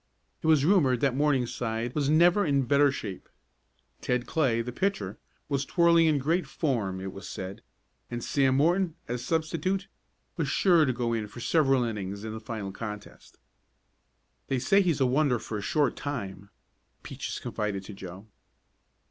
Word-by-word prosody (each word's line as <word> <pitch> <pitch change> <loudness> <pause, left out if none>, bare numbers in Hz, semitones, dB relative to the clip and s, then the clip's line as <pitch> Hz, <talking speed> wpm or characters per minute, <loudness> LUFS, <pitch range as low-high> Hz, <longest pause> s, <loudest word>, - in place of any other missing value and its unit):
It - - -2
was 155 -3 +4
rumored 150 - +4
that 135 -3 +2
Morningside 125 -4 0
was 145 -2 0
never 175 +6 +5
in 140 -4 +2
better 140 +2 +4
shape. 105 -8 -7 0.7
Ted 125 -1 0
Clay, 125 -7 +1
the 125 - -5
pitcher, 180 - -2 0.3
was 140 -2 0
twirling 170 +1 +4
in 155 -2 +3
great 165 +7 0
form 110 - -1
it 95 0 -6
was 95 - -9
said, 95 +1 -6 0.5
and 120 0 -5
Sam 135 -2 +2
Morton, 170 +3 +2
as 120 0 -3
substitute, 165 +4 -1 0.5
was 160 -4 0
sure 170 +2 +4
to 130 - +1
go 120 -1 -1
in 110 -2 -2
for 105 - -11
several 135 -1 +3
innings 100 -3 -4
in 110 0 -5
the 110 - -5
final 110 -3 -5
contest. 105 0 -9 1.1
"They 135 - 0
say 195 +11 +3
he's 170 -7 +1
a - - +5
wonder 130 0 +2
for 110 -1 -5
a - - -5
short 145 +7 +1
time," 100 -9 -5 0.5
Peaches - - -5
confided 100 -2 -3
to 105 - -9
Joe. 95 +1 -9
130 Hz, 165 wpm, -28 LUFS, 110-155 Hz, 1.1 s, never